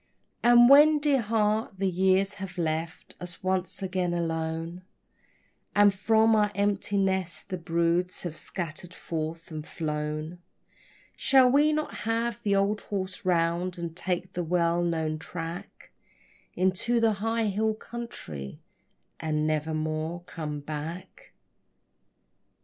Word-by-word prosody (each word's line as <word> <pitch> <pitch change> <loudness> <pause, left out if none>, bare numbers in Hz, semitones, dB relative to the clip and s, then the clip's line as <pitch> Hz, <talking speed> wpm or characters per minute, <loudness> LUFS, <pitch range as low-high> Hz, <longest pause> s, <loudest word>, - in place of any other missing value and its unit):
And 240 0 +7
when, 295 +3 +8
dear 290 -3 +2
heart, 215 0 +1
the 195 0 0
years 190 +2 +2
have 185 -1 -6
left 165 0 -3
us 175 0 -8
once 185 +1 0
again 180 -2 -1
alone, 165 +1 -3 0.9
And 205 -1 +6
from 220 +3 +3
our 210 -1 +3
empty 200 0 0
nest 190 -3 -1
the 185 -2 -3
broods 170 +1 0
have 170 -3 -4
scattered 175 +1 -6
forth 165 +1 -5
and 155 -1 -5
flown, 155 +1 -4 0.8
Shall 260 -2 +5
we 295 +3 +4
not 305 0 -2
have 230 0 -2
the 200 -1 +1
old 200 +2 +1
horse 190 -2 -5
round 175 +1 +1
and 170 -1 -5
take 180 0 -2
the 175 - -2
well 170 0 +1
known 160 -2 -1
track 165 +1 -7 0.6
Into 190 +6 +1
the 225 -1 +3
high 225 +1 0
hill 215 +2 0
country, 85 - -8 0.6
and 155 -1 -1
never 155 0 0
more 155 +2 -2
come 150 -4 -6
back? 160 - -7
180 Hz, 125 wpm, -27 LUFS, 165-210 Hz, 0.9 s, when